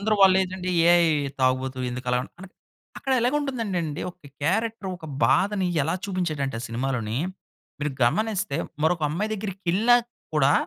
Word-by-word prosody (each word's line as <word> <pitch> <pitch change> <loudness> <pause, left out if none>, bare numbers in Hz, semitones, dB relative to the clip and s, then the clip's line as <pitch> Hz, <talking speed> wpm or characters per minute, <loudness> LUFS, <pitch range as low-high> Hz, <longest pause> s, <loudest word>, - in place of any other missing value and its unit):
అందరూ 215 +1 +2
వాళ్ళు 190 -1 +7
ఏంటంటె? 185 0 -4 0.2
ఏయ్! 170 -2 +5 0.3
తాగుబోతు 130 0 +1
ఎందుకు 125 +1 -6
అలా 125 - +2 0.2
అంటే, 190 0 -11 0.5
అక్కడ 270 -1 -2
ఎలాగుంటుందంటే 250 -6 0
అండి, 150 0 -4
ఒక 175 -4 -18 0.2
క్యారెక్టర్ 220 +5 0
ఒక 160 - -10 0.2
బాధని 195 -1 +2 0.2
ఎలా 160 +5 0
చూపించాడంటే, 155 - -2
ఆ - - -6
సినిమాలోని. 115 -2 -2 0.6
మీరు 150 - 0
గమనిస్తే 200 - 0 0.3
మరొక 165 0 +2
అమ్మాయి 205 +8 -2
దగ్గరికెళ్ళినా 195 +3 +2 0.4
కూడా 145 -2 +4
180 Hz, 140 wpm, -25 LUFS, 140-210 Hz, 0.6 s, వాళ్ళు